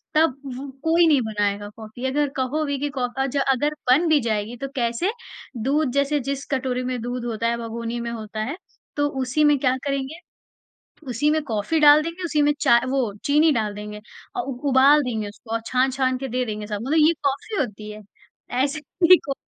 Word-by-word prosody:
तब 310 -4 +3 0.2
व 275 +2 -7
कोई 330 +1 +4
नहीं 285 -5 +4
बनाएगा 205 -2 -2
कॉफ़ी। 225 +3 -8
अगर 290 +1 +1
कहो 270 +4 0
भी 285 -1 -2
कि 290 0 -1
कॉफ 250 -3 -3
अज 270 +1 0
अगर 275 +2 +1 0.2
बन 325 +6 +4
भी 310 - +5
जाएगी 220 0 -2
तो - - -1
कैसे, 240 - 0 0.5
दूध 275 +3 +1
जैसे 280 +1 +1
जिस 280 0 -3
कटोरी 255 -1 -1
में 250 -1 -2
दूध 245 0 -4
होता 230 -1 -1
है, 235 0 0
भगोनी 230 +1 -4
में 235 0 -4
होता 220 -2 -6
है, 285 +10 -4 0.4
तो 290 0 +1
उसी 260 +4 +1
में 295 -1 +5
क्या 255 -1 +2
करेंगे, 275 +2 -2 0.9
उसी 255 +5 +1
में 310 0 +1
कॉफ़ी 235 +5 -1
डाल 295 +1 +8
देंगे, 335 +3 -6
उसी 300 -3 +1
में 295 0 +4
चाय 235 -5 +5
वो 255 -6 0
चीनी 300 +3 +4
डाल 215 -4 -1
देंगे 210 0 -7 0.4
और 365 - -1
उ 250 - -4
उबाल 275 +3 +6
देंगे 220 -5 -3
उसको, 215 +2 -15
और 230 - 0
छान-छान 260 0 +1
के 270 - -5
दे 250 +1 -1
देंगे 210 -2 -5
सबको, 210 +1 -4
मतलब 310 -1 +5
ये 335 - +5
कॉफ़ी 280 +10 -1
होती 215 -4 -4
है! 210 0 -9 0.5
ऐसे 275 +4 0 0.3
ही 365 - +11
कॉफ़ी 275 - -5
260 Hz, 200 wpm, -23 LUFS, 230-290 Hz, 0.9 s, ही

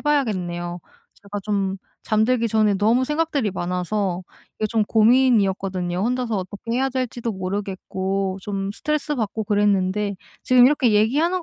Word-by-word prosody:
봐야겠네요. 180 - -1 0.4
제가 205 0 -5
좀 195 -2 -1 0.3
잠들기 230 +2 +2
전에 215 -1 +3
너무 230 +5 +3
생각들이 300 -6 0
많아서 180 +1 -2 0.4
이게 215 - 0
좀 220 0 +1
고민이었거든요. 200 -6 +2
혼자서 245 0 -1
어떻게 205 +5 -7
해야 265 +2 +1
될지도 250 -3 -3
모르겠고 190 0 -3
좀 195 0 -3
스트레스받고 280 -7 -2
그랬는데 205 -1 +1 0.3
지금 255 -1 +6
이렇게 255 -4 +4
얘기하는 305 - +2
210 Hz, 350 characters per minute, -22 LUFS, 195-250 Hz, 0.4 s, 지금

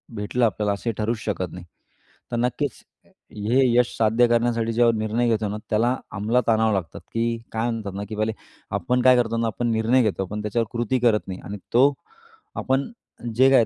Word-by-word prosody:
भेटलं 105 +4 0
आपल्याला 105 -2 0
असे 115 +4 -2
ठरवूच 110 +1 -1
शकत 95 -5 -2
नाही. 90 0 -9 0.7
तर 120 - -1
नक्कीच 125 +2 -2 0.5
हे 110 +6 +1 0.2
यश 125 0 +2
साध्य 115 +2 +4
करण्यासाठी, 115 -1 +1
ज्यावर 115 0 +4
निर्णय 110 +2 0
घेतो 110 -2 +1
ना 105 - -3
त्याला 115 +4 +2 0.2
अंमलात 110 +5 0
आणावं 110 -1 +3
लागतात, 95 -4 -3
की 115 0 0
काय 115 +2 -1
म्हणतात 110 -4 -4
ना 100 - -3
की 110 - -5
पहिले 110 +1 0 0.5
आपण 125 -1 0
काय 130 0 +7
करतो 115 -1 +1
ना, 115 - +1
आपण 120 +1 -1
निर्णय 115 +3 +3
घेतो 95 -3 0
पण 105 +3 -5
त्याच्यावर 105 +2 -1
कृती 120 +2 0
करत 115 -3 +2
नाही 95 -1 -6
आणि 105 - -5 0.2
तो 135 +4 +5 0.6
आपण 135 +9 0 0.4
जे 130 +2 +6
काय 125 -4 +6
115 Hz, 190 wpm, -23 LUFS, 105-120 Hz, 0.7 s, काय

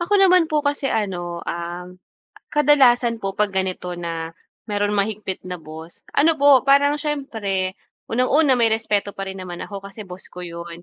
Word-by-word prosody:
ako 345 +4 -3
naman 365 -3 +5
po 300 -1 +1
kasi 285 -1 0
ano, 175 -6 -2
um, 175 +2 -6 0.5
kadalasan 255 -6 +4
po 195 -1 -3
'pag 210 -1 +1
ganito 185 -1 -2
na 165 -1 -4 0.4
merong 205 0 0
mahigpit 200 -2 -2
na 180 -2 -6
boss 160 +2 -11
ano 320 +3 +5
po, 285 -3 +6
parang 280 +1 +4
siyempre 220 -11 -2 0.3
unang-una 260 +4 +3
may 235 -2 +3
respeto 215 -2 0
pa 195 0 -5
rin 190 0 -6
naman 175 -1 -7
ako 200 -1 -7
kasi 205 +3 -9
boss 180 0 -10
ko 180 - -8
'yon, 170 0 -8
205 Hz, 165 wpm, -22 LUFS, 180-275 Hz, 0.5 s, po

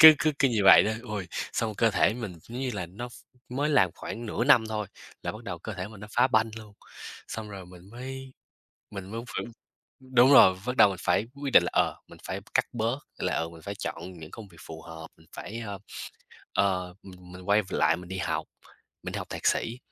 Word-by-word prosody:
cứ 160 0 +13
cứ 155 - +2
cứ 135 - +5
như 115 -4 +1
vậy 95 - +10
đó. 110 - +1
Ôi, 105 -6 -4 0.3
xong 110 -1 -1
cơ 115 +2 +3
thể 110 - +3
mình, 115 -6 -5
giống 120 +2 -8
như 130 -1 -1
là, 90 -4 -3
nó 105 +8 -7
ph 120 - -16 0.4
mới 145 +4 0
làm 95 - +4
khoảng 115 +5 -6
nửa 115 +2 -1
năm 125 -5 +6
thôi, 105 -1 -2 0.4
là - - -2
bắt 110 +2 -10
đầu 85 - -5
cơ 110 +6 -6
thể 90 +1 -5
mình 105 -2 -12
nó 105 - -8
phá 120 +3 +4
banh 110 -3 +2
luôn. 110 -2 -10 0.6
Xong 110 -1 -6
rồi 95 -2 -8
mình 90 +1 -14
mới 130 +3 -8 0.6
mình 95 -1 -7
mới 115 +2 -4 0.2
phải - - -2 0.7
đúng 125 +2 +7
rồi, 95 -9 +9
bắt 125 +2 -2
đầu - - +8
mình 95 -2 -4
phải 95 +3 +2
quyết 140 -1 -4
định - - +9
là, - - -2
ờ, - - +2
mình - - -14
phải - - -3
cắt - - +3
bớt 120 +2 -1 0.2
là, - - 0
ờ, 80 - -1
mình 85 -1 -13
phải 100 - -5
chọn 90 -2 -5
những 80 -1 -10
công 110 -3 -10
việc 85 -3 -18
phù 80 0 -9
hợp, 80 -1 -9
mình 80 - -22
phải, 115 - -6
ơ, 100 -1 -5 0.7
ờ, 90 -2 +1
ừm, 90 -2 -13
mình 90 0 -10
quay 105 +1 +5
v 95 - -12
lại 80 +1 +3
mình 90 +1 -10
đi 95 +1 -4
học, - - -1 0.6
mình - - -5
đi - - -2
học - - -6
thạc - - -4
sĩ. 115 +2 +1
105 Hz, 240 wpm, -28 LUFS, 90-120 Hz, 0.7 s, cứ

